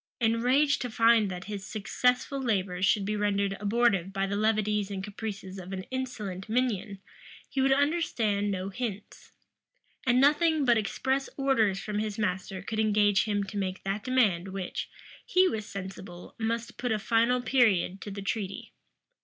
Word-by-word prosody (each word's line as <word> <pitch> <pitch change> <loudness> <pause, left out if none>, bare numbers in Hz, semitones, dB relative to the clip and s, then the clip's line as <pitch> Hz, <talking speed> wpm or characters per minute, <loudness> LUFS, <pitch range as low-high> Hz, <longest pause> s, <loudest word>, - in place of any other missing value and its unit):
Enraged 250 +5 +2
to 250 - -2
find 225 -2 +4
that 180 -1 -5
his 200 -1 -6
successful 250 +6 0
labors 190 -6 0
should 200 -2 +2
be 210 +1 -1
rendered 200 -1 0
abortive 205 -3 +2
by 195 0 -1
the 200 +1 -2
levities 210 -1 +1
and 195 -1 -4
caprices 195 -2 -6
of 185 +1 -9
an 190 0 -4
insolent 215 -8 -4
minion, 220 -4 0 0.5
he 270 - -1
would 270 0 +3
understand 270 -9 +1
no 190 -1 -2
hints; 205 -1 -6 0.8
and 245 0 +4
nothing 300 +2 +4
but 240 -2 +5
express 265 +5 -1
orders 225 -8 +2
from 210 +1 -3
his 215 -1 -3
master 190 -2 -2
could 220 +2 -3
engage 210 -2 +3
him 205 -2 0
to 200 +1 -7
make 190 -1 -3
that 195 +2 -2
demand 215 -9 +2
which, 190 -1 -5 0.3
he 370 0 +4
was 220 - -3
sensible, 185 -2 -8
must 230 +1 -3
put 245 -1 -1
a 220 - +2
final 230 +4 +2
period 220 -7 +2
to - - -6
the 200 0 -6
treaty. 200 -1 -4
210 Hz, 160 wpm, -28 LUFS, 195-240 Hz, 0.8 s, but